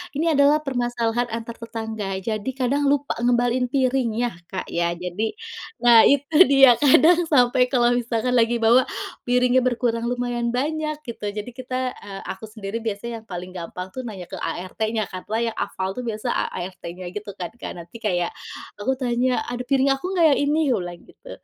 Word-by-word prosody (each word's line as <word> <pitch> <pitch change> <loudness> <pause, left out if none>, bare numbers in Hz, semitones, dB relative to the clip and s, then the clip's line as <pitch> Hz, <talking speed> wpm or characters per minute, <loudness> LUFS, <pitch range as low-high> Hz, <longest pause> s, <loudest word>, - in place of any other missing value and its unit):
ini 325 +2 +1
adalah 295 +1 +4
permasalahan 240 -2 -1
antar 230 0 -6
tetangga. 220 -4 -4
Jadi 215 +2 -2
kadang 275 +2 +1
lupa 285 0 +1
ngembaliin 245 +1 +2
piringnya 245 -3 +1 0.2
Kak 190 - -6
ya 170 0 0
jadi, 180 +5 -3 0.5
nah 235 -2 +8
itu 285 +2 +1
dia 270 -3 +6
kadang 325 +4 +5
sampai 250 -3 +4
kalau 245 -2 +3
misalkan 245 0 0
lagi 235 0 +3
bawa 235 +3 +4 0.4
piringnya 250 +1 +4
berkurang 235 -2 0
lumayan 245 -1 -1
banyak 305 +3 -1
gitu, 225 -3 -5
jadi 210 +3 -5
kita, 255 +1 -3
eee, 195 -1 -8
aku 190 +4 -6
sendiri 215 0 -5
biasanya 225 +1 -4
yang 225 - -28
paling 180 0 -6
gampang 180 +1 -7
tuh 260 - -4
nanya 190 -5 -7
ke 190 - -5
ART-nya, 215 +5 -2
karena 195 +4 -4
yang - - -15
hafal 190 -1 -2
tuh - - -2
biasa 225 +2 -2 0.2
ART-nya 180 0 -7
gitu 210 -1 -6
kan, 175 -2 -5
Kak. - - -5
Nanti 170 +7 -10
kayak 175 -4 0 0.5
aku 265 +6 0
tanya, 250 0 +1
"Ada 245 0 -4
piring 275 0 +3
aku 270 +6 -6
nggak 335 -2 +4
yang - - +1
ini?" 295 +2 +2
Aku 230 -6 +2
bilang 175 -1 -7
gitu, - - -17
235 Hz, 175 wpm, -23 LUFS, 210-255 Hz, 0.5 s, nah